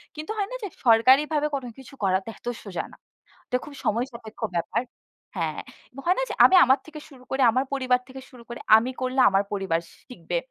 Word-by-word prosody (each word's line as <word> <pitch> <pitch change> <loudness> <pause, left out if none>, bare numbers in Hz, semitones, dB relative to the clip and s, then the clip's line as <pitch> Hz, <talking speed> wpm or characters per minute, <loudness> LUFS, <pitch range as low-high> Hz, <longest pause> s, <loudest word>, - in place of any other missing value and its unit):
কিন্তু 310 +5 -6
হয় 400 - -1
না - - -4
যে - - -2 0.2
সরকারিভাবে 270 +6 +4
কোন 275 - -2 0.2
কিছু 265 0 -13
করাতো 190 +1 +1
এত - - -14 0.2
সোজা 195 -4 -4
না। - - -16 0.5
এটা 250 - 0
খুব 295 - -11
সময় 235 +4 +1
সাপেক্ষ 225 -2 -12 0.2
ব্যাপার 175 +7 -1 0.6
হ্যাঁ। - - -2 0.4
হয় 360 +2 +3
না - - +1
যে? - - -3
আমি 375 - +6
আমার 260 +1 +4
থেকে 310 -1 -10
শুরু 260 -4 -16
করি, 265 - -1
আমার 260 +4 0
পরিবার 255 -2 +2
থেকে 265 0 -10
শুরু 250 -3 -15
করে 235 - -7 0.2
আমি 240 +3 -1
করলে 255 +1 -1
আমার 195 0 +2
পরিবার 190 -5 0 0.3
শিখবে। 175 -8 -4
255 Hz, 200 wpm, -25 LUFS, 220-275 Hz, 0.6 s, আমি